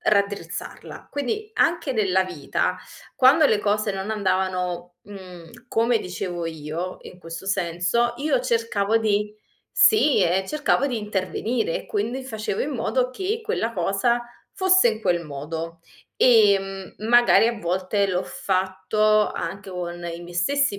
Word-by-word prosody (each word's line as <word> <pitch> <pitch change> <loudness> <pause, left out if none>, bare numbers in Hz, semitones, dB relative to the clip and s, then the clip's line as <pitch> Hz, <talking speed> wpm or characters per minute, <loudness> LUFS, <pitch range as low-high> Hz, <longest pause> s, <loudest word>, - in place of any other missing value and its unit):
raddrizzarla. 200 -1 -2
Quindi, 415 - -3
anche 330 -4 +1
nella 190 -4 +2
vita, 175 -6 -2 0.4
quando 280 +4 +6
le 220 - +3
cose 210 +1 0
non 195 +1 -4
andavano, 185 -3 -1
mhmm, 185 0 -12
come 230 +1 +2
dicevo 180 -2 -5
io, 160 +3 -5
in 180 - -12
questo 165 +1 -8
senso, 190 +5 0
io 285 -1 +1
cercavo 230 -3 +1
di 210 -1 0 0.4
Sì, 305 - +5
e 185 +2 +1
cercavo 295 0 +1
di 250 -4 -2
intervenire, 215 - -2
e - - -7
quindi 270 - -2
facevo 220 -6 -4
in 295 - -1
modo 255 0 0
che 385 - -3
quella 230 - -2
cosa 200 +5 +1 0.3
fosse 375 -7 +4
in 220 -1 -2
quel 175 -5 0
modo. 160 +3 -6 0.4
Ehm, 195 -5 +3
m 215 - -8
magari 240 -1 +6
a 235 -2 -3
volte 190 +2 0
l'ho 185 -1 -1
fatto 190 +3 +1
anche 200 0 -5
con 175 -1 -5
i 170 0 -5
miei 175 0 -10
stessi 275 +5 +1
205 Hz, 140 wpm, -23 LUFS, 180-240 Hz, 0.4 s, quando